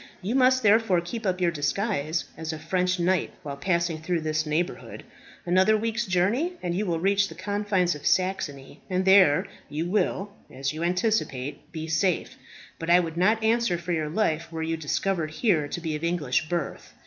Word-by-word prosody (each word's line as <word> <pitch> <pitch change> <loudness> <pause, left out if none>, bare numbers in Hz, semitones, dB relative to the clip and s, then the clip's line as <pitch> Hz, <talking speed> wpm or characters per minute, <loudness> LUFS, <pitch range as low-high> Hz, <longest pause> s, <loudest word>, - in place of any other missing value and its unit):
You 205 +5 -1
must 260 -1 +4
therefore 210 -3 +4
keep 210 +6 -5
up 185 0 0
your 175 -2 +2
disguise 165 0 -1
as 160 0 -5
a 160 - -5
French 180 +3 0
knight 180 +1 +1
while 140 -1 -5
passing 170 +1 -1
through 170 0 -1
this 155 0 -1
neighbourhood. 165 +4 -3 0.4
Another 185 +5 +4
week's 230 +1 -2
journeying, 205 - +1
and 175 - -1
you 200 +3 -1
will 165 -2 0
reach 200 +2 +2
the 160 - -11
confines 195 -1 0
of 150 - -5
Saxony, 165 -8 -1
and 185 0 0
there 190 -6 +6 0.2
you 155 +3 -2
will, 200 +1 0 0.2
as 135 +2 -3
you 155 - -6
anticipate, 170 - -1
be 160 -1 -5
safe. 175 +2 0 0.4
But 165 - -4
I 175 +1 +7
would 165 -2 -3
not 215 +6 +2
answer 225 -5 +2
for 175 +1 -5
your 155 -3 -1
life 165 -3 -1
were 160 -1 -3
you 165 +1 -1
discovered 160 +2 -1
here 155 -3 +1
to 160 - -4
be 160 -2 -3
of 150 - -6
English 160 -3 0
birth. 170 -5 -4
175 Hz, 185 wpm, -26 LUFS, 160-200 Hz, 0.4 s, I